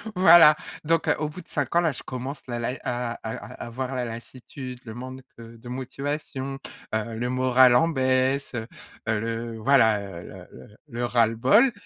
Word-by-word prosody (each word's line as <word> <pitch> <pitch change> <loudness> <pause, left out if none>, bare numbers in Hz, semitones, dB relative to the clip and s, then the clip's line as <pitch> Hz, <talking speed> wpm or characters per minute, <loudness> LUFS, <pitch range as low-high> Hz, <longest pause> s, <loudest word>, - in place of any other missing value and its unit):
Voilà, 170 -4 +8 0.3
donc, 165 +1 +1
heu, - - +3
au 155 0 -1
bout 175 +4 -9
de - - -22
5 145 +1 -2
ans 170 - +5
là 165 -2 +2
je 130 - -8
commence 130 +2 -5
la 120 -1 -3
lai, 120 +2 -2
heu - - -9
à 120 -1 -2
à 110 - -4 0.3
à - - -6
avoir 130 +3 -4
la 125 -1 -1
lassitude, 125 +2 -8
le 110 - -8
manque, 130 +2 -8 0.2
heu, 115 0 -11
de 120 +2 -11
motivation, 135 +1 -4 0.4
heu, 110 +1 -2
le 120 +2 -2
moral 130 0 +5
en 165 +5 +5
baisse, 130 -2 +1
heu 110 -1 -4 0.4
heu, 110 -1 +1
le 115 +1 -4
voilà, 110 -3 +4
heu, 95 -4 -8
le - - -11 0.2
le 105 - -19
le 120 -2 -3
ras-le-bol 120 - +4
125 Hz, 195 wpm, -25 LUFS, 115-140 Hz, 0.4 s, Voilà